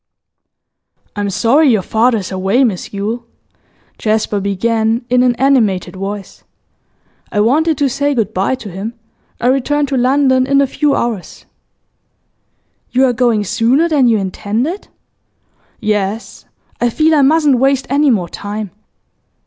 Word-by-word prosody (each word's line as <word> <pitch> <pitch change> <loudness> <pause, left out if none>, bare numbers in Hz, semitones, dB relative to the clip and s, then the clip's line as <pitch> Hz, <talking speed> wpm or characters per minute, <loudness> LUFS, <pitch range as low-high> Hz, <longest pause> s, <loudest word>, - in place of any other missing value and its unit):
'I'm 205 -1 -2
sorry 255 +10 +3
your 215 -6 +2
father 230 +4 +2
is 195 -2 -5
away, 190 +7 +1
Miss 210 -8 -2
Yule,' 215 +4 -4 0.8
Jasper 215 -1 0
began, 220 +4 -1
in 250 0 +4
an 250 -1 +2
animated 235 -9 +1
voice. 195 +1 -7 0.9
'I 205 - +1
wanted 305 +7 +2
to 285 - +1
say 285 +2 -1
good 220 -3 -1
bye 190 +7 0
to 215 -6 -10
him. 205 +6 -6 0.4
I - - -4
return 275 +3 +1
to 275 -1 -3
London 260 0 +2
in 275 0 +3
a 280 - +4
few 290 +2 0
hours.' 225 -6 -4 1.4
'You 260 +2 +3
are 250 - +1
going 235 -3 +1
sooner 245 - +2
than 290 -6 +2
you 225 -2 +3
intended?' 215 - -3 0.9
'Yes, 210 +1 -3 0.4
I 240 - +2
feel 315 +6 +2
I 300 - +4
mustn't 290 -2 +3
waste 270 0 +2
any 285 +1 +2
more 195 -8 +1
time. 205 +2 -6
235 Hz, 140 wpm, -15 LUFS, 205-275 Hz, 1.4 s, in